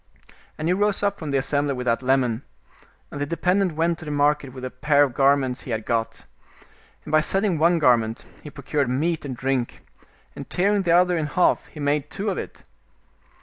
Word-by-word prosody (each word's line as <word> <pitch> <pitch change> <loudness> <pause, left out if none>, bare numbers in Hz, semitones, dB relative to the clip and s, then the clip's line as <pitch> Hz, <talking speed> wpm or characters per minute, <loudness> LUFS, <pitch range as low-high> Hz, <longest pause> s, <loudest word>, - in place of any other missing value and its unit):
And 155 - -3
he 175 - +3
rose 205 +1 0
up 200 0 0
from 155 - -5
the 140 - +1
assembly 140 +1 0
with 125 0 -5
that 115 0 +1
lemon, 130 -3 +1 0.7
and 145 - -6
the 145 - -1
de 170 - -4
pendent 185 -1 +1
went 165 +1 0
to - - -9
the - - -6
market 145 -1 +1
with 130 0 -10
the 130 - -4
pair 145 +2 +3
of 135 -4 -1
garments 135 -1 +2
he - - -11
had 110 -2 -3
got. 115 -1 -2 0.8
And - - -7
by 155 0 +5
selling 190 0 0
one 170 +2 +4
garment 120 -6 +2 0.2
he 150 - -9
procured 140 -1 -2
meat 155 +5 -1
and 130 -3 -5
drink, 130 -2 -2 0.5
and - - -9
tearing 200 +3 +1
the 175 -3 0
other 180 0 +3
in 155 - -2
half 180 +4 +1
he 150 - -13
made 145 0 0
two 200 +1 -3
of - - -3
it. - - -9
145 Hz, 210 wpm, -23 LUFS, 130-170 Hz, 0.8 s, by